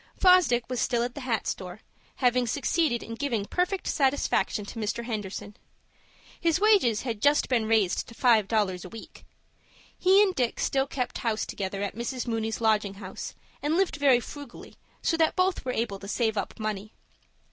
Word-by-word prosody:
Fosdick 360 -11 +5
was 250 -1 -3
still 235 -2 +1
at 245 0 -3
the 285 - -7
hat 235 -5 -1
store, 185 +3 -5 0.3
having 250 -1 +2
succeeded 285 0 0
in 230 - -7
giving 230 -5 -2
perfect 360 - -1
satisfaction 265 -6 +1
to 225 - -8
Mr. 220 +2 -2
Henderson. 210 -2 -5 0.8
His 335 0 +2
wages 395 - +4
had 230 -5 -4
just 290 +1 +3
been 235 -4 +1
raised 215 -5 +2
to 230 - -12
five 225 -5 +4
dollars 200 -5 0
a 185 - -9
week. 225 +2 -12 0.7
He 385 +2 +5
and 385 -3 +1
Dick 245 -7 -1
still 270 0 +1
kept 250 -3 -3
house 220 -2 -1
together 195 0 -4
at 200 - -3
Mrs. 240 +2 -3
Mooney's 225 -2 -2
lodging 210 -3 +1
house, 195 -1 -7 0.3
and 300 +3 +1
lived 380 -4 +1
very 275 -4 +5
frugally, 280 +1 -10 0.3
so 330 - +1
that 320 -1 +2
both 370 0 +1
were 255 - -2
able 225 -5 -2
to 200 - -9
save 220 +1 0
up 205 - -4
money. 215 -1 -4
235 Hz, 180 wpm, -27 LUFS, 215-285 Hz, 0.8 s, Fosdick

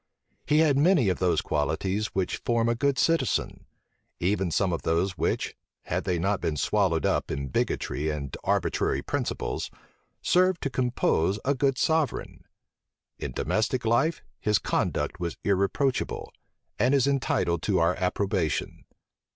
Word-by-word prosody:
He 150 +1 +4
had 140 -3 +3
many 155 - +4
of 90 - -1
those 90 -1 +2
qualities 95 +8 -1
which 95 -5 -2
form 115 -1 0
a 115 - +3
good 140 +2 0
citizen: 165 -4 0 0.5
even 95 0 +1
some 90 +2 +1
of 85 - -2
those 85 +4 +1
which, - - -1 0.3
had - - -2
they 90 -2 0
not 95 +4 0
been 75 - -1
swallowed 90 -3 +1
up - - +1
in 70 -1 -3
bigotry 75 +4 -1
and 70 -3 -4
arbitrary - - 0
principles, - - -3 0.5
serve 185 -1 +3
to 140 - -2
compose 120 -8 +1
a 140 - +3
good 135 -1 +1
sovereign. 160 -2 0 0.7
In - - -4
domestic 110 - -1
life, 120 +9 +2 0.2
his 105 -1 +2
conduct - - -1
was 85 -2 -3
irreproachable, 100 +7 0 0.5
and 130 +3 +3
is 135 -2 +3
entitled 135 - +1
to 100 -3 +1
our 85 +1 +3
approbation. 95 -4 -1
105 Hz, 145 wpm, -27 LUFS, 85-135 Hz, 0.7 s, He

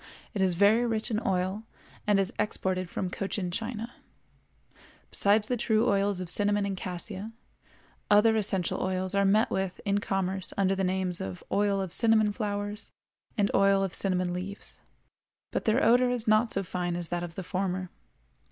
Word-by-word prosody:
It 205 - -2
is 185 -2 +2
very 205 +6 +4
rich 225 -1 -1
in 215 - +1
oil, 190 +2 0 0.5
and 205 -1 +4
is 195 -1 0
exported 185 -3 -1
from 180 0 -3
Cochin 195 -2 -3
China. 230 +3 -4 1.2
Besides 205 +1 +3
the 250 - -1
true 225 0 +1
oils 200 -1 +1
of 185 - -4
cinnamon 205 +3 +2
and 200 -1 -2
cassia, 190 +4 -5 0.8
other 210 +2 +5
essential 195 -4 0
oils 185 0 -1
are 200 0 +3
met 210 +3 +3
with 190 -1 -2
in 200 0 +2
commerce 195 -1 -2
under 195 -1 +2
the 195 0 -1
names 185 -1 +1
of 95 -1 -6
oil 200 -1 +2
of 190 -3 -3
cinnamon 220 -2 +3
flowers 205 -1 -3 0.5
and 205 -1 +2
oil 195 0 +4
of 190 - -3
cinnamon 180 -2 0
leaves, 190 +3 -6 0.7
but - - -2
their 230 +4 +2
odor 245 +3 +5
is 245 -2 -2
not 215 +2 +3
so 195 - -1
fine 175 -1 -3
as 175 -2 0
that 175 0 -2
of 170 -1 -7
the 190 - -5
former. 185 0 -3
195 Hz, 170 wpm, -28 LUFS, 185-215 Hz, 1.2 s, other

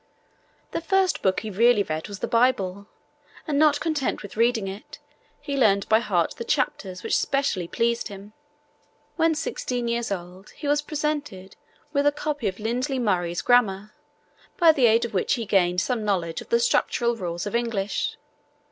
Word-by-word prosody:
The - - -3
first 380 +2 +1
book 190 -1 +1
he 220 - -6
really 225 +1 +4
read 155 -3 -4
was 200 -2 -9
the - - -1
Bible, 205 -5 +1 0.6
and 290 -2 0
not 300 -1 +4
content 310 -8 -1
with 205 - -9
reading 230 -2 +2
it, 195 +2 -8 0.4
he 280 - -4
learned 200 -7 +3
by 220 - +5
heart 185 -8 0
the - - -4
chapters 195 -8 -2
which - - 0
specially 275 -11 0
pleased 235 +4 0
him. 200 +1 -11 0.8
When 325 -1 +2
sixteen 250 -5 -3
years 235 -2 -1
old 180 +1 -7
he 290 - -6
was 290 +1 +2
presented 295 -11 -4 0.4
with 285 0 +2
a - - +5
copy 290 -4 -3
of 190 +1 -4
Lindley 250 +5 -1
Murray's 175 -7 0
Grammar, 215 -4 +2 0.6
by 335 -2 +7
the 265 -6 +3
aid 230 +1 +3
of 235 - -7
which 190 - +1
he 230 -3 -4
gained 180 -3 +2
some 245 -1 -1
knowledge 180 -5 -1
of - - -13
the 470 - +3
structural 240 - +1
rules 175 -4 -4
of 205 - -5
English. 230 -4 -1
230 Hz, 175 wpm, -24 LUFS, 195-275 Hz, 0.8 s, by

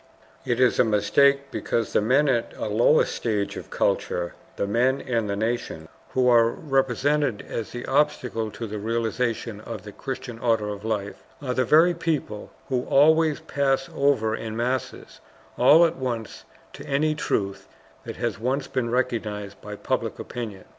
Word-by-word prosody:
It 120 -1 0
is 125 -1 +3
a - - +7
mistake, 140 +6 +3
because 115 -3 -2
the - - +3
men 135 +7 +3
at 120 -4 0
a - - -3
lower 115 +8 +4
stage 105 -4 -2
of - - -8
culture, 85 -1 -1 0.2
the, - - -1
men 125 +6 +2
and 115 -6 -2
the 100 - -1
nations 115 +4 -3 0.2
who 130 -1 +2
are 115 -2 +5
represented 135 -2 0
as 115 - -4
the 120 - -6
obstacle 130 -6 0
to 115 - -6
the 105 -1 -5
realization 115 0 -2
of 110 -3 -7
the 105 - -9
Christian 125 0 -6
order 115 -3 +1
of 100 0 -6
life, 105 -3 -3 0.2
are 130 -4 -3
the 130 0 +1
very 160 +7 +5
people 155 -11 -3 0.2
who 130 -2 +1
always 155 +1 +4
pass 135 -1 0
over 130 -6 +2
in 110 0 -6
masses 125 +2 -3 0.4
all 165 +3 +7
at 165 0 -1
once 120 -4 -4 0.3
to - - -9
any 150 +3 +1
truth 100 -9 -2 0.4
that - - -7
has 115 -1 -3
once 130 +4 -1
been 125 -3 -2
recognized 110 -5 -2
by 105 0 -7
public - - -2
opinion. 110 -6 -7
120 Hz, 165 wpm, -25 LUFS, 110-135 Hz, 0.4 s, a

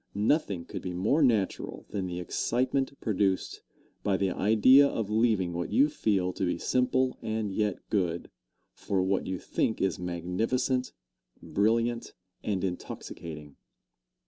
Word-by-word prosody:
Nothing 105 - +1
could - - -6
be 90 - -4
more 110 - +2
natural 110 -8 +1
than 95 -3 -2
the 90 0 -4
excitement 130 +8 -1
produced 100 -4 0 0.4
by 100 -2 +1
the 95 -1 0
idea 110 +9 +6
of 110 -6 -3
leaving 110 -6 +2
what 85 -1 -3
you 145 +2 +4
feel 95 -10 0
to 95 - -4
be 90 -2 0
simple 125 +4 +1
and 110 -2 -2
yet 105 -2 -1
good, 85 -5 -1 0.4
for 95 -2 -1
what 95 +1 0
you 95 0 -2
think 110 - -1
is 95 - 0
magnificent, 100 +9 -1 0.5
brilliant 115 +3 0 0.3
and 100 -3 -1
intoxicating. 80 -5 -6
100 Hz, 135 wpm, -29 LUFS, 90-120 Hz, 0.5 s, idea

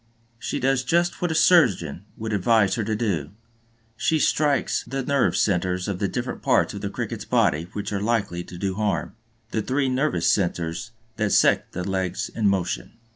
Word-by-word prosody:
She 115 - -3
does 135 0 +1
just 170 +6 +1
what 175 - +1
a - - -1
surgeon 100 - +3
would 110 0 -4
advise 105 0 +3
her 110 - -1
to 110 +1 -1
do; 95 -10 -1 0.7
she 160 +7 +1
strikes 145 -1 +1
the 135 0 -4
nerve 140 0 +1
centers 90 -2 0
of 95 -3 -3
the 100 - +1
different 125 +5 -4
parts - - +2
of - - -6
the - - -3
Cricket's - - -4
body 80 +3 +1
which 105 0 -4
are 100 - -1
likely 100 -6 -1
to 90 - -10
do 95 +1 -2
harm, 105 0 -1 0.4
the 110 - 0
three 135 +3 0
nervous 130 - 0
centers 85 +2 0 0.3
that 110 -2 0
set - - +3
the 90 +1 -4
legs 95 -1 -2
in 110 -2 0
motion. 95 -3 -1
105 Hz, 180 wpm, -24 LUFS, 95-130 Hz, 0.7 s, surgeon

